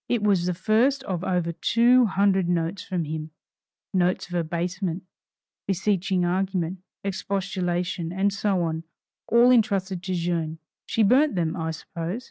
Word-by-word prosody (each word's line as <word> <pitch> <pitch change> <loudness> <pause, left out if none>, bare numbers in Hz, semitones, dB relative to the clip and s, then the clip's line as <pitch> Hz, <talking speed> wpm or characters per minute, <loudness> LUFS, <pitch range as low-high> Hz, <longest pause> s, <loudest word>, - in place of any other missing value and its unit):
It 235 -3 +1
was 190 -4 +2
the 180 - 0
first 235 +9 +2
of 185 -7 -3
over 180 -3 0
two 235 +8 +4
hundred 190 -2 +2
notes 170 +2 -1
from 180 -3 -2
him, 155 0 -5 0.6
notes 180 -1 +1
of - - -9
abasement, 175 +2 -2 0.6
beseeching 190 -1 +1
argument, 185 -1 -1 0.2
expostulation, 185 -3 -2
and 195 +2 +1
so 200 -2 0
on, 160 0 -2 0.4
all 240 +2 +5
entrusted 200 -6 +2
to 185 0 -3
Jeanne. 165 -2 -1 0.3
She 225 - +2
burnt 260 +4 +4
them, 165 -1 0
I 160 -3 -3
suppose. 165 +4 -5
185 Hz, 140 wpm, -25 LUFS, 170-200 Hz, 0.6 s, all